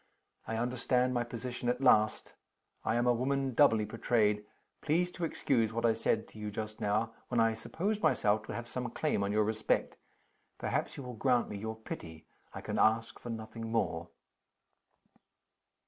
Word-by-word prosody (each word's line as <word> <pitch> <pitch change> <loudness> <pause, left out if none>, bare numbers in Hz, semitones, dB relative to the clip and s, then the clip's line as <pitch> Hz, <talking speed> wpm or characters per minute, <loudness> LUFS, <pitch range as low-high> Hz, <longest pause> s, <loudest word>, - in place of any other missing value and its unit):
"I 115 - -2
understand 125 +1 +1
my 120 -1 +1
position 120 +1 -4
at 125 - 0
last. 110 -5 +3 0.5
I - - +1
am 120 +1 +2
a 125 - +5
woman 135 +2 0
doubly 115 -5 +5
betrayed. 105 -2 +1 0.4
Please 175 +4 +1
to 175 - -6
excuse 115 -8 +1
what 115 +1 0
I 115 - +5
said 110 0 0
to 110 - -13
you 105 0 -3
just 110 +1 -5
now, 110 +2 0
when 120 - 0
I 115 0 +4
supposed 195 - -2
myself 110 -8 +3
to - - -5
have 120 0 -5
some 125 -1 -3
claim 120 -4 0
on 100 - -1
your 105 +1 +3
respect. 110 +1 0 0.6
Perhaps - - -2
you 140 - -6
will 125 -1 -6
grant 125 +1 +2
me 105 - -5
your 110 +1 -4
pity? 80 -7 -8 0.3
I - - -7
can - - -3
ask 115 +1 +2
for 120 - -8
nothing 110 0 -6
more." 85 -7 -1
115 Hz, 175 wpm, -32 LUFS, 110-125 Hz, 0.6 s, a